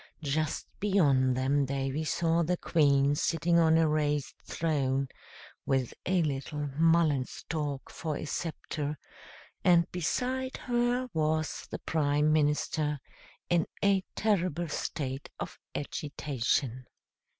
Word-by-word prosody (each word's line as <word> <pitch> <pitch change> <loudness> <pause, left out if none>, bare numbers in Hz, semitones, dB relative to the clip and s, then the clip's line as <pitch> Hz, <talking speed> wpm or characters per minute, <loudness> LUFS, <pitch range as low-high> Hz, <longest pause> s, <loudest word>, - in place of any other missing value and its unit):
Just 155 +1 -1
beyond 140 -11 +3
them 140 +2 +2
Davy 135 +2 -2
saw 165 +1 +2
the 175 +2 +1
Queen 140 -4 +3
sitting 165 +3 +2
on 160 -1 +5
a 165 -1 +4
raised 150 -3 0
throne, 140 -4 0 0.6
with 130 -3 0
a 180 -2 +3
little 145 0 -3
mullen 160 -4 +4
stalk 145 -3 -4
for 155 -3 -3
a - - -5
sceptre, 150 -2 -3 0.7
and 170 -2 +4
beside 255 +9 -1
her 245 +1 0
was 155 -1 0
the - - -4
Prime 150 -1 +1
Minister, 150 0 +1 0.5
in 175 -2 +2 0.2
a 200 -1 +4
terrible 180 -6 0
state 140 -2 -3
of - - -6 0.2
agitation. 135 -4 -2
155 Hz, 115 wpm, -30 LUFS, 140-170 Hz, 0.7 s, on